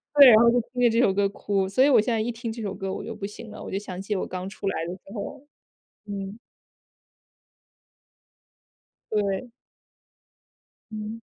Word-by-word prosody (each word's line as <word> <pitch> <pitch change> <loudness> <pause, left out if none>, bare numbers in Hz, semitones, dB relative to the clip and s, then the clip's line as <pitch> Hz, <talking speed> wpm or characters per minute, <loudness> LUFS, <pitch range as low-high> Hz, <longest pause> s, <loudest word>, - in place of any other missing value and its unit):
对， 280 -2 +10
然 215 - +8
后 235 - +7
就 245 0 +3
听 250 - -3
着 240 - +6
这 230 - +1
首 195 - +4
歌 200 0 +2
哭。 195 -1 -1
所 225 +7 +3
以 - - +5
我 260 - +6
现 235 +2 0
在 225 - +1
一 235 +2 -1
听 230 0 -5
这 230 -1 -7
首 200 - -3
歌 195 0 -4
我 - - -5
就 225 - -5
不 200 -2 -5
行 210 +1 -10
了， - - -9
我 - - -7
就 195 - -1
想 190 -3 -7
起 205 +2 -2
我 - - -2
刚 185 +1 -5
出 200 - -7
来 165 - -1
的 175 - -4
时 185 - -15
候， 275 +7 -6 0.6
嗯。 200 +1 -5 2.7
对。 205 +2 0 1.4
嗯。 215 +1 -6
210 Hz, 205 characters per minute, -26 LUFS, 195-230 Hz, 2.7 s, 对